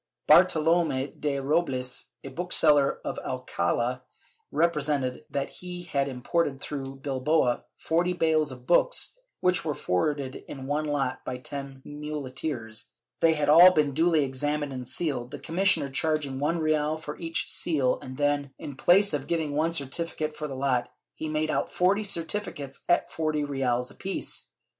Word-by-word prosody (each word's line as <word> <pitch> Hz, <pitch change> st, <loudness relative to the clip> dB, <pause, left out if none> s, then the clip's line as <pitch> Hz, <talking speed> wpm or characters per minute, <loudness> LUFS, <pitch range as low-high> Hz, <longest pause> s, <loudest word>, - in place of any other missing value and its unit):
Bartolome 155 Hz, -4 st, +4 dB
de 145 Hz, -2 st, -1 dB
Robles, 135 Hz, -3 st, 0 dB, 0.2 s
a 135 Hz, -, -6 dB
bookseller 150 Hz, -2 st, +3 dB
of -, -, -3 dB
Alcald, 125 Hz, 0 st, -1 dB, 0.5 s
represented 150 Hz, -6 st, 0 dB
that 140 Hz, -1 st, -3 dB
he 180 Hz, -1 st, -7 dB
had 140 Hz, -5 st, -1 dB
imported 135 Hz, +2 st, -1 dB
through 135 Hz, -2 st, -5 dB
Bilbao 135 Hz, -1 st, 0 dB
forty 175 Hz, +2 st, +1 dB
bales 160 Hz, -4 st, +2 dB
of 125 Hz, -1 st, -11 dB
books, 335 Hz, -, +2 dB, 0.3 s
which 180 Hz, +1 st, +2 dB
were 150 Hz, -3 st, -2 dB
forwarded 135 Hz, -, -1 dB
in 135 Hz, -2 st, -7 dB
one 145 Hz, +3 st, -1 dB
lot 140 Hz, -3 st, -1 dB
by 125 Hz, -, -4 dB
ten 135 Hz, 0 st, -7 dB
muleteers; 140 Hz, -5 st, -5 dB, 0.3 s
they 165 Hz, -1 st, +4 dB
had 150 Hz, -1 st, 0 dB
all 170 Hz, +5 st, +9 dB
been 150 Hz, -4 st, +2 dB
duly 160 Hz, 0 st, +3 dB
examined 145 Hz, +2 st, -2 dB
and 125 Hz, -1 st, -6 dB
sealed, 135 Hz, -8 st, -1 dB
the 145 Hz, -, -7 dB
commissioner 165 Hz, +1 st, +1 dB
charging 140 Hz, 0 st, 0 dB
one 150 Hz, +4 st, 0 dB
real 155 Hz, -1 st, +1 dB
for 150 Hz, -2 st, -7 dB
each 165 Hz, -1 st, -1 dB
seal 140 Hz, -7 st, +1 dB
and 130 Hz, 0 st, -8 dB
then, 145 Hz, -1 st, 0 dB
in 145 Hz, -, -8 dB
place 185 Hz, +6 st, +4 dB
of 145 Hz, -1 st, -2 dB
giving 160 Hz, -4 st, -1 dB
one 160 Hz, +3 st, +1 dB
certificate 155 Hz, +1 st, -1 dB
for 150 Hz, 0 st, -4 dB
the 135 Hz, -, -6 dB
lot, 130 Hz, -2 st, 0 dB, 0.2 s
he 155 Hz, -, -5 dB
made 155 Hz, 0 st, 0 dB
out -, -, -1 dB
forty 195 Hz, +4 st, +2 dB
certificates 165 Hz, -7 st, -2 dB
at 175 Hz, -, +2 dB
four 155 Hz, -1 st, -1 dB
reales 135 Hz, -4 st, -1 dB
apiece. 195 Hz, 0 st, -3 dB
145 Hz, 150 wpm, -27 LUFS, 135-160 Hz, 0.5 s, all